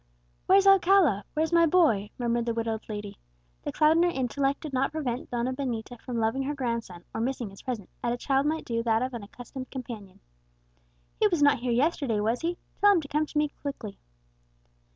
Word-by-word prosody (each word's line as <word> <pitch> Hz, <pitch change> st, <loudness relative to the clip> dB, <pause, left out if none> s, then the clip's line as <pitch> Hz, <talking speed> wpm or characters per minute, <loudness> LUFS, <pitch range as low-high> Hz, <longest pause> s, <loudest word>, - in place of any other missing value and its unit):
"Where's 390 Hz, +1 st, +6 dB
Alcala? 380 Hz, -, +5 dB
where's 315 Hz, +2 st, 0 dB
my 335 Hz, -1 st, +6 dB
boy?" 290 Hz, -, +3 dB
murmured 235 Hz, -1 st, 0 dB
the 230 Hz, -, 0 dB
widowed 225 Hz, -1 st, -2 dB
lady. 205 Hz, -1 st, -6 dB, 0.4 s
The -, -, -4 dB
cloud 310 Hz, +1 st, +4 dB
on -, -, +4 dB
her 350 Hz, -, +4 dB
intellect 275 Hz, -1 st, -1 dB
did 305 Hz, -4 st, -7 dB
not 265 Hz, +1 st, +1 dB
prevent 260 Hz, -6 st, -3 dB
Donna 245 Hz, +1 st, -1 dB
Benita 245 Hz, -3 st, -4 dB
from 245 Hz, -2 st, -4 dB
loving 225 Hz, +4 st, +1 dB
her 285 Hz, +2 st, -2 dB
grandson, 230 Hz, -9 st, -3 dB
or -, -, -2 dB
missing 245 Hz, -3 st, -2 dB
his 195 Hz, -, -13 dB
presence, 235 Hz, -7 st, -5 dB
as 235 Hz, -, +1 dB
a 240 Hz, -, -1 dB
child 275 Hz, +2 st, +1 dB
might 315 Hz, +1 st, -1 dB
do 230 Hz, -1 st, -1 dB
that 225 Hz, 0 st, +2 dB
of 260 Hz, 0 st, -3 dB
an 235 Hz, -, -5 dB
accustomed 250 Hz, +5 st, -9 dB
companion. 230 Hz, -7 st, -8 dB, 1.0 s
"He 430 Hz, -, +5 dB
was 345 Hz, -7 st, +1 dB
not 285 Hz, -3 st, +5 dB
here 245 Hz, 0 st, -1 dB
yesterday, 255 Hz, -3 st, +1 dB
was 225 Hz, +4 st, 0 dB
he? 340 Hz, +1 st, -1 dB, 0.2 s
tell 410 Hz, 0 st, +6 dB
him 350 Hz, -, +2 dB
to 285 Hz, -, -9 dB
come 300 Hz, +2 st, 0 dB
to 300 Hz, -, -5 dB
me 300 Hz, 0 st, +2 dB
quickly." 250 Hz, -8 st, -6 dB
255 Hz, 205 wpm, -27 LUFS, 230-300 Hz, 1.0 s, Where's